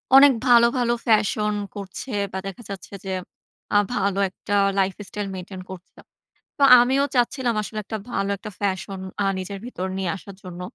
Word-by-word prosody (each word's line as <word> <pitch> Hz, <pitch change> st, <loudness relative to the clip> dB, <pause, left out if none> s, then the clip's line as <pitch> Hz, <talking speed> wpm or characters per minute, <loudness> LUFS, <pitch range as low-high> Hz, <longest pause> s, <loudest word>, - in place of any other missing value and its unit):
অনেক 275 Hz, +1 st, +9 dB, 0.2 s
ভালো, 235 Hz, -1 st, +7 dB
ভালো 240 Hz, -1 st, +2 dB
ফ্যাশন 210 Hz, -1 st, +2 dB, 0.2 s
করছে, 200 Hz, +6 st, -7 dB, 0.2 s
বা 190 Hz, -, -4 dB
দেখা 195 Hz, +5 st, -8 dB
যাচ্ছে 195 Hz, 0 st, -8 dB
যে 190 Hz, -, -3 dB, 0.6 s
আ -, -, +2 dB, 0.2 s
ভালো 200 Hz, -3 st, 0 dB
একটা 200 Hz, +2 st, -6 dB, 0.3 s
lifestyle 195 Hz, +1 st, -2 dB
maintain 185 Hz, 0 st, -7 dB
করছে। 185 Hz, 0 st, -11 dB, 0.6 s
তো -, -, -7 dB, 0.2 s
আমিও 265 Hz, +3 st, +3 dB
চাচ্ছিলাম 245 Hz, -1 st, +1 dB
আসলে 215 Hz, +1 st, -5 dB
একটা 220 Hz, +2 st, -4 dB
ভালো 195 Hz, -2 st, -1 dB
একটা 210 Hz, +2 st, -8 dB
ফ্যাশন 195 Hz, -1 st, -2 dB, 0.2 s
আ -, -, +1 dB
নিজের 190 Hz, +1 st, -5 dB
ভিতর 190 Hz, -7 st, -4 dB
নিয়ে 190 Hz, -2 st, -1 dB
আসার 195 Hz, 0 st, -11 dB
জন্য। 180 Hz, -1 st, -8 dB
200 Hz, 160 wpm, -23 LUFS, 190-235 Hz, 0.6 s, অনেক